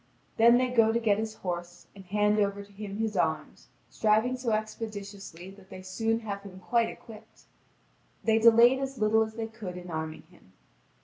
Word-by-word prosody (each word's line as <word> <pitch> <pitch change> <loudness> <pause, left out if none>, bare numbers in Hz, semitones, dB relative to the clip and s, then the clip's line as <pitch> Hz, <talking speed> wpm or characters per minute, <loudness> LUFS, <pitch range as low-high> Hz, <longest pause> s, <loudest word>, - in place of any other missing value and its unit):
Then 235 +2 +7
they 255 0 +1
go 230 -3 +4
to 230 - +1
get 215 -3 +2
his 220 0 -4
horse, 175 -1 -6
and 195 - -11
hand 210 +2 +2
over 200 0 0
to 200 - -19
him 200 0 -7
his 220 -1 -2
arms, - - -2 0.2
striving 220 +4 +2
so 250 -1 -3
expeditiously 205 -4 -5
that 195 -1 -17
they 185 - -10
soon 225 +4 -1
have 200 -3 -5
him 190 -2 -11
quite 230 +5 +1
equipped. 220 -2 -13 0.8
They 225 0 +3
delayed 235 +3 +6
as 270 -1 -4
little 220 0 +3
as 220 0 -2
they 225 -1 -3
could 220 -5 -8
in 180 -1 -9
arming 160 0 -5
him. 95 - -22
215 Hz, 185 wpm, -28 LUFS, 195-225 Hz, 0.8 s, Then